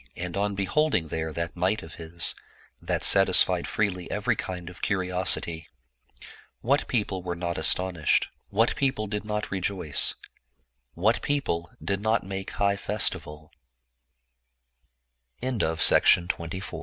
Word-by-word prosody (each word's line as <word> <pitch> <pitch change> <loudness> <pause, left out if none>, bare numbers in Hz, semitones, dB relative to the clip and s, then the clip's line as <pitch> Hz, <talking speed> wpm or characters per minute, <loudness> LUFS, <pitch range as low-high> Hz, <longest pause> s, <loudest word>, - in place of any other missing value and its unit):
And 90 0 -5
on 100 0 -1
be 100 0 -1
holding 95 - 0
there 80 +1 -3
that 85 +1 -5
might 95 +5 0
of 80 -1 -11
his, 80 +1 0 0.5
that - - -2
satisfied 95 -2 +5
freely 90 -4 -2
every - - 0
kind 90 -2 -6
of 90 +1 -11
curiosity, 90 -4 +1 0.9
what 140 +4 +1
people 100 -6 -2
were 90 -1 -4
not 85 0 -4
astonished, 85 0 +2 0.2
what 115 +4 +1
people 130 -6 -1
did 105 +1 -5
not 105 0 -4
rejoice, 95 -5 +1 0.8
what 105 +7 +1
people 85 -13 -2
did 100 0 -2
not 110 +1 +1
make 95 0 -6
high 100 0 +1
fes 105 +1 +2
95 Hz, 120 wpm, -26 LUFS, 85-105 Hz, 0.9 s, satisfied